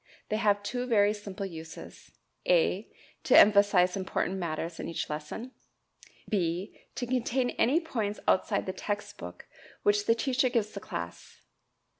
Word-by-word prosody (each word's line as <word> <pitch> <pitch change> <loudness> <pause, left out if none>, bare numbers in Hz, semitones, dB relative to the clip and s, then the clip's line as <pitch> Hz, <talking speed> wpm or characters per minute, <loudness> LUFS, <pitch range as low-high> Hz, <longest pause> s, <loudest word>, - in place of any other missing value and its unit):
They 215 - 0
have 205 -2 +2
two 245 +4 -3
very 210 -3 +4
simple 205 -1 -6
uses 160 -3 -9 0.4
(a) - - +2 0.3
to - - +5
emphasize 200 -3 +6
important 190 0 -1
matters 165 -1 -3
in - - -4
each 165 - -3
lesson; 155 +12 -5 0.8
(b) 180 -1 -1 0.2
to 250 - -2
contain 250 0 0
any 275 +8 +3
points 225 -11 -3
outside 185 - +2
the 185 - -3
text 205 +1 -4
book 90 0 -9 0.4
which 205 0 +2
the 230 - +5
teacher 255 +2 +1
gives 220 -3 0
the 200 - -6
class. 85 - -7
205 Hz, 145 wpm, -29 LUFS, 180-235 Hz, 0.8 s, emphasize